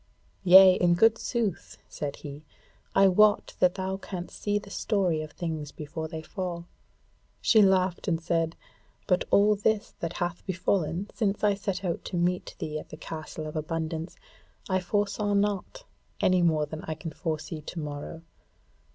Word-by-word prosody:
"Yea, 190 0 +9
in 175 -1 +3
good 225 +5 +4
sooth," 225 -7 -2
said 145 -2 -5
he, 145 +1 -9 0.5
"I 195 - +7
wot 210 +3 +4
that 180 -1 +4
thou 190 0 -2
canst 180 -2 -7
see 205 0 +1
the 200 -1 -7
story 190 -8 0
of 155 -1 -8
things 160 -4 -4
before 160 +1 -6
they 160 0 -7
fall." 175 -1 -5 0.7
She 220 - +5
laughed 190 -2 +2
and 165 -3 +1
said: 165 0 0 0.5
"But 180 -2 +1
all 210 +1 +5
this 210 +1 0
that 165 0 -3
hath 175 0 -3
befallen 185 0 -1
since 210 -3 -1
I 205 -1 +4
set 195 -1 -3
out 170 -2 -2
to - - -5
meet 180 +1 -1
thee 155 0 -4
at - - -12
the 155 - -9
Castle 155 0 -7
of 155 - -7
Abundance 160 +1 -3 0.5
I 185 -1 +1
foresaw 205 +2 0
not, 205 - -1 0.4
any 185 -1 +3
more 160 -3 +3
than 155 +1 -7
I 160 - -3
can 160 +1 -7
foresee 155 -1 -4
to 165 +3 -7
morrow. 150 +2 -6
175 Hz, 165 wpm, -28 LUFS, 160-195 Hz, 0.7 s, Yea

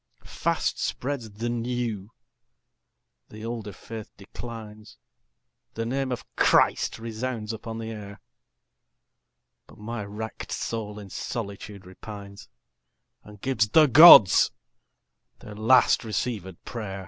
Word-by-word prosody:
Fast - - -2
spreads 130 -4 -3
the 110 +3 -5
new; 120 -4 -3 1.2
the 110 +1 -10
older 115 -3 -5
faith 110 +3 -9
declines. 110 - -10 0.8
The 115 - -3
name 130 +2 -2
of 125 - -4
Christ - - +3
resounds 115 0 -5
upon 110 0 -7
the 115 0 -6
air. 100 -2 -9 1.5
But - - -17
my 110 +1 -6
wrack'd 105 +2 -7
soul 105 -2 -4
in 100 -3 -10
solitude 100 -4 -6
repines 100 +1 -11 0.8
And 105 -1 -15
gives 120 -5 0
the 155 +6 +6
Gods 145 - +9 0.9
their 105 - -11
last 110 +5 +4
receivèd 105 -4 -4
pray'r. 100 -5 -6
110 Hz, 110 wpm, -25 LUFS, 105-120 Hz, 1.5 s, Gods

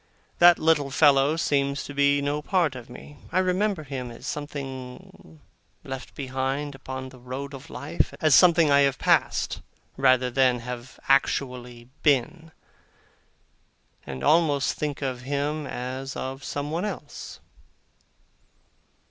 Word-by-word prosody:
That 175 0 +8
little 155 -3 +2
fellow 140 +1 +4
seems 140 -3 0
to 145 - -8
be 140 0 +3
no 145 +1 -1
part 170 -3 +1
of 125 -2 -10
me; 145 +4 -12
I 175 - 0
remember 185 -1 +1
him 135 -3 -5
as 115 - -11
something 145 +4 -7 0.4
left 135 -3 -7
behind 135 +2 -3
upon 130 -1 -7
the 130 -1 -15
road 130 +3 -6
of 140 +3 -10
life 155 +4 -2
as 155 -3 +3
something 165 -2 +6
I 140 - +6
have 140 -2 +3
passed, - - +1 0.4
rather 130 -2 +3
than 125 -1 +2
have 125 +1 -8
actually 125 -3 0
been 155 +3 +1 1.5
and 65 -1 -7
almost 150 -3 +3
think 145 -2 -4
of 130 -2 -3
him 145 +3 -2
as 130 +2 -5
of 135 +1 -5
someone 150 +4 -3
else. 195 -8 -7
140 Hz, 130 wpm, -25 LUFS, 130-150 Hz, 1.5 s, That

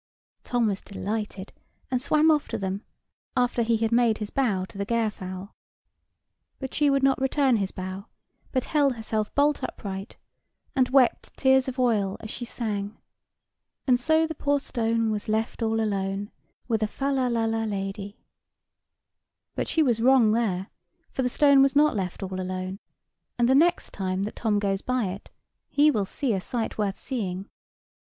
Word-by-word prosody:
Tom 245 -2 +1
was 200 -2 -1
delighted, 205 -1 -5 0.4
and 250 -1 +1
swam 305 +3 +4
off 300 -2 +1
to - - -3
them, 195 +2 -3 0.5
after 245 -1 +2
he 230 0 +2
had 225 0 0
made 235 -2 +3
his 210 -1 -5
bow 210 -9 +1
to - - -18
the - - +1
Gairfowl. 200 -4 -3 1.0
But 265 -1 -6
she 295 -1 +3
would 275 -1 +2
not 270 0 +3
return 265 -2 +3
his 195 -2 -1
bow: 190 +3 -6 0.4
but 255 -2 0
held 285 -4 +2
herself 220 -1 -2
bolt 290 +1 +3
upright, 195 +1 -6 0.6
and 260 -2 +3
wept 260 -2 +2
tears 265 -1 +4
of 260 0 -4
oil 215 -6 +1
as 215 - -7
she 240 - -5
sang: 210 -3 -4 0.9
"And 250 -2 +4
so 315 +5 +3
the 320 - -4
poor 285 -1 +1
stone 230 -3 0
was 210 0 -3
left 220 +2 -1
all 225 0 +1
alone; 200 -1 -2 0.4
With 225 -3 0
a 215 - +2
fal 275 +5 -2
lal 260 -2 +1
la 225 -1 0
lady." 200 0 -4 1.4
But - - -2
she 320 - +2
was 235 -5 +1
wrong 250 -3 +5
there; 200 -5 0 0.4
for - - -2
the 250 - +1
stone 280 +1 +5
was 275 0 +3
not 300 -2 +4
left 190 -1 -3
all 185 0 -4
alone: 185 +1 -4 0.6
and 240 -1 +3
the 260 - +4
next 340 +6 +3
time 190 -1 -2
that 210 - -4
Tom 215 -3 +1
goes 195 -1 0
by 255 -6 0
it, 195 +2 -8 0.4
he 295 +1 +4
will 210 -7 0
see 265 0 -1
a 190 - -1
sight 225 +1 -3
worth 200 -2 0
seeing. 195 -7 -4
225 Hz, 175 wpm, -26 LUFS, 200-265 Hz, 1.4 s, wrong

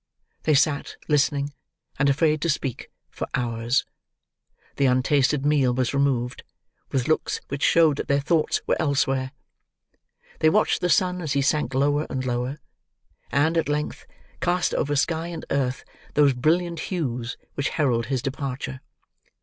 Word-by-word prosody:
They 155 - +4
sat, 145 0 +1
listening, 145 -1 +1 0.5
and 140 +1 +4
afraid 155 +1 +2
to 170 - 0
speak, 140 -4 -2 0.2
for - - -5
hours. 115 0 0 0.9
The 140 - +3
untasted 135 +2 +2
meal 140 -4 +3
was 130 -1 0
removed, 130 -3 0 0.5
with 130 -3 0
looks 155 - 0
which 140 0 -4
showed 160 -4 +4
that - - -4
their 140 0 +2
thoughts 155 +2 +1
were - - +1
elsewhere, 135 -3 +1 1.1
they 155 - +5
watched 215 +6 +2
the 180 - +1
sun 180 +3 +2
as 155 -4 -2
he 140 0 +1
sank 145 -3 0
lower 145 +3 +2
and 130 -1 -3
lower, 125 +3 -2 0.7
and, 155 +4 +2
at 160 - -2
length, 150 0 -3 0.3
cast 175 +1 +1
over 145 0 0
sky 160 +3 0
and 170 -1 -6
earth 130 -2 -1 0.3
those 145 -2 +5
brilliant 170 +6 +1
hues 125 -10 -3 0.2
which 140 - -1
herald 120 -7 0
his 130 -2 -1
departure. 135 -1 -4
140 Hz, 150 wpm, -24 LUFS, 130-155 Hz, 1.1 s, they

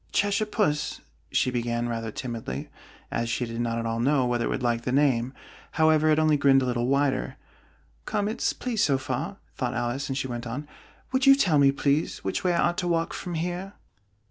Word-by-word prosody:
"Cheshire 205 +1 +1
Puss," 200 -9 0 0.3
she 130 - +2
began, 120 -1 -1
rather 115 -1 -3
timidly, 115 - -5 0.4
as 115 0 -1
she 120 +1 -1
did 115 0 -4
not 115 -1 -1
at 115 - -2
all 115 0 -1
know 135 +1 +2
whether 120 -1 0
it - - 0
would 130 - -2
like 120 -1 +1
the 125 - -3
name: 130 -3 +2 0.4
however, 155 -1 +4
it 155 - +4
only 155 -1 +4
grinned 135 -1 +4
a - - 0
little 120 -1 0
wider. 140 0 +1 0.7
"Come, 205 - -1
it's 220 - 0
pleased 240 -4 -1
so 140 -2 +3
far," 135 +9 -4 0.2
thought 125 -2 -2
Alice, 120 +4 -2
and 135 - -2
she 135 - -1
went 120 -1 -5
on: 140 +6 -5 0.4
"Would 260 +1 +1
you 275 - +9
tell 180 - +3
me, 140 -1 +6
please, 140 +2 0
which - - -2
way 180 - +2
I 170 - +3
ought 175 - -3
to 180 - -1
walk 165 -1 0
from 175 -1 -5
here?" 180 +4 -3
135 Hz, 210 wpm, -26 LUFS, 120-165 Hz, 0.7 s, you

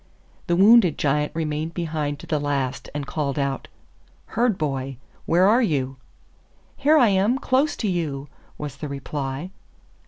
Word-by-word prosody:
The 175 - +2
wounded 195 -3 +6
Giant 150 +1 +1
remained 155 0 -2
behind 155 -4 -2
to - - -10
the 155 - 0
last 140 -3 -2
and 145 -1 -4
called 140 -1 -2
out, 140 -1 -2 0.7
'Herd 235 -3 +2
boy, 135 -5 -3 0.3
where 180 +3 +4
are 230 +5 +5
you?' 135 - 0 0.8
'Here 305 +3 +4
I 245 -7 +6
am, 200 +6 +2
close 270 +2 +1
to 220 - -1
you,' 150 -7 -2 0.3
was 145 -2 -6
the 150 - -5
reply. 140 +3 -4
155 Hz, 150 wpm, -23 LUFS, 140-190 Hz, 0.8 s, wounded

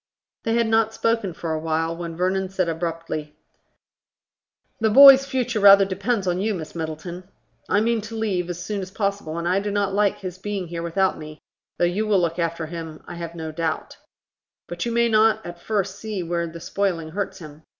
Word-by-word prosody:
They 225 0 +1
had 235 0 +3
not 220 0 +2
spoken 230 -4 0
for 165 -1 -4
awhile, 160 +1 -1
when 165 -1 -6
Vernon 185 +1 0
said 185 -2 -1
abruptly, 165 -2 -4 1.4
"The 220 -1 +2
boy's 275 +3 +9
future 250 -4 -1
rather 200 -1 +8
depends 200 +2 -1
on 180 0 0
you, 215 0 0
Miss 155 -3 -7
Middleton. 170 +3 -6 0.4
I 205 +2 +3
mean 230 0 +1
to 220 +2 -8
leave 195 -6 -1
as 175 0 -5
soon 205 -2 -3
as 185 - -6
possible, 200 -5 -3
and 170 0 -2
I 185 +2 +2
do 205 +1 -3
not 200 -1 0
like 205 0 +2
his 185 -1 -6
being 195 -3 -4
here 170 0 -4
without 185 +2 0
me, 155 0 -9 0.4
though 175 - +3
you 200 +5 0
will 205 -3 +3
look 170 0 -1
after 165 -1 -1
him, 160 -1 -8
I - - -7
have 170 -1 -7
no 160 -1 -5
doubt. 160 0 -3 0.7
But 175 +6 -4
you - - -1
may 235 0 +3
not 220 0 +3
at 175 0 -8
first 200 -2 -2
see 210 -4 -4
where 170 0 -2
the 165 +1 -9
spoiling 170 -3 -2
hurts 195 +1 -3
him. 155 -4 -11
185 Hz, 200 wpm, -23 LUFS, 165-210 Hz, 1.4 s, boy's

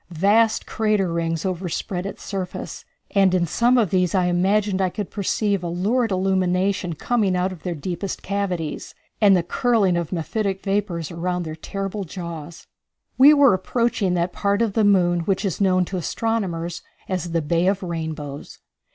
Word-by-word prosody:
Vast 220 +5 +3
crater 210 -5 0
rings 165 0 -1
overspread 180 0 -3
its - - -8
surface, 190 -3 -5 0.3
and 195 -2 +4
in 175 -1 +2
some 240 +9 +2
of 220 -8 +2
these 180 -1 +2
I 185 -1 +3
imagined 190 +3 +1
I 185 - +2
could 205 +1 -5
perceive 200 -1 0
a - - -2
lurid 220 +8 0
illumination 185 -1 +1
coming 200 +3 0
out 180 +1 0
of 180 -4 -10
their 180 -2 -3
deepest 180 +5 -5
cavities, 185 -5 -3 0.3
and 200 -3 +6
the 175 - 0
curling 205 -1 +2
of 170 -2 -3
mephitic 195 +3 -2
vapors 195 -5 -1
around 180 +1 -2
their 155 -1 -6
terrible 195 +4 -4
jaws. 170 -2 -8 0.5
We 280 +3 +9
were 280 -5 +6
approaching 210 0 0
that 175 +1 -1
part 200 +2 +1
of 220 -4 -1
the 220 - +2
moon 180 -4 +3
which 190 +4 -1
is 195 0 -2
known 185 -2 +3
to 185 - -4
astronomers 175 -4 -2 0.3
as 180 -2 -2
the 165 -1 0
Bay 170 +4 +1
of 195 0 +1
Rainbows. 160 -4 -5
185 Hz, 170 wpm, -22 LUFS, 175-200 Hz, 0.5 s, We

